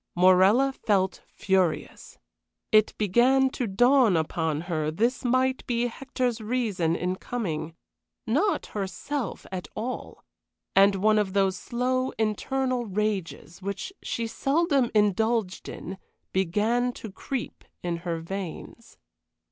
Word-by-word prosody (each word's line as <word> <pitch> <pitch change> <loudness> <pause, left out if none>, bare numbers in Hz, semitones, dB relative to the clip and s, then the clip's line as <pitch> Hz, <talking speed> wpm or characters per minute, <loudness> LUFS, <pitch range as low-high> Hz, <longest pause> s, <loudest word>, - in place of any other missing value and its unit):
Morella 190 +9 +5
felt 190 -6 0
furious. 190 -4 -1 0.5
It 215 -1 +4
began 255 +6 +3
to 250 -3 -2
dawn 245 -1 +4
upon 160 -1 -1
her 160 -3 -2
this 230 +11 0
might 255 +1 +1
be 240 -1 +1
Hector's 245 -1 -2
reason 210 -8 0
in 180 +1 -2
coming, 165 -10 -4 0.5
not 310 - +1
herself 210 +5 -4
at 185 -1 -5
all; 240 +4 -5 0.5
and 195 +1 +6
one 215 +2 +3
of 195 -3 -1
those 195 -2 +2
slow, 255 +6 -1
internal 245 +3 -1
rages 195 -4 -3
which 200 - -4
she 230 - -3
seldom 275 +1 +1
indulged 210 -1 +1
in 190 +2 -7 0.3
began 210 +7 +1
to 220 - -8
creep 260 +5 -5 0.2
in 175 -1 -1
her 170 -1 -4
veins. 185 0 -7
210 Hz, 115 wpm, -26 LUFS, 185-245 Hz, 0.5 s, and